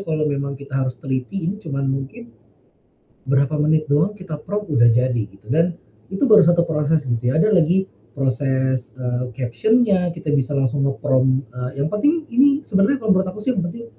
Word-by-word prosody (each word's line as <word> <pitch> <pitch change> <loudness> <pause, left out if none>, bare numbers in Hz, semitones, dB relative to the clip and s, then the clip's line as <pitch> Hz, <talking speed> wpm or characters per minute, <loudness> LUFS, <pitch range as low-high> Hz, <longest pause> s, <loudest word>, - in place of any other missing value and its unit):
Kalau 155 -1 0
memang 140 -1 -2
kita 140 0 -13
harus 130 -1 -1
teliti 135 +8 -4
ini 200 +5 -3
cuman 140 -6 -4
mungkin, 135 -3 -5 0.9
berapa 140 +2 +1
menit 155 0 +1
doang 155 +8 +2
kita 185 -7 -7
prompt 205 +4 -5
udah 120 -3 +4
jadi 125 +2 +2
gitu 100 0 -7
dan, 165 +5 +2 0.4
itu 195 - +1
baru 215 -4 +7
1 170 0 +3
proses 150 -1 0
gitu 120 -1 -1
ya 150 - +1
ada 215 +3 +3
lagi 180 +2 +3 0.3
proses, 130 -1 -1
eee, 125 0 -3
caption-nya 185 - +1
kita 165 -3 -7
bisa 140 0 0
langsung 135 +1 0
nge-prompt, 130 -1 +1
eee, 125 +1 -5
yang 150 - -1
penting 300 +9 +1 0.4
sebenarnya 200 +6 +2
kalau 220 - -3
menurut 185 0 0
aku 195 - -9
sih 255 +4 0
yang 190 - 0
penting, 230 +7 -7
145 Hz, 180 wpm, -20 LUFS, 130-185 Hz, 0.9 s, baru